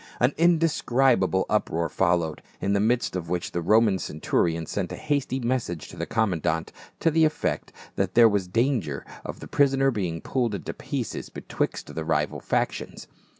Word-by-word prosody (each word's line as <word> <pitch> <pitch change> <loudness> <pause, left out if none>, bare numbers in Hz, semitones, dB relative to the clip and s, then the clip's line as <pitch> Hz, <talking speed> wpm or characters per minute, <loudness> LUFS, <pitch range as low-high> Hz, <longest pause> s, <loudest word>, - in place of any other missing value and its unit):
An 125 +4 +3
indescribable 135 - +3
uproar 85 -6 0
followed, 85 -4 0 0.2
in 100 - 0
the 100 - +2
midst 115 0 +1
of 85 -3 -4
which 90 0 -2
the 85 - -2
Roman 105 +2 +4
centurion 80 +1 -1
sent - - -3
a - - -4
hasty 140 -3 -1
message 120 - -2
to - - -10
the - - -4
commandant, 85 -7 0 0.3
to 165 - +3
the 160 +1 +3
effect 155 0 0 0.3
that 95 -1 -1
there 115 -1 +8
was 100 -4 0
danger 110 - 0 0.2
of - - -7
the - - -8
prisoner 135 -1 +3
being 90 -8 -2
pulled 120 -1 -1
in 95 - -6
pieces - - -4
betwi.xt - - -4
the 80 - -3
rival 80 0 0
factions. - - -2
105 Hz, 165 wpm, -26 LUFS, 85-130 Hz, 0.3 s, there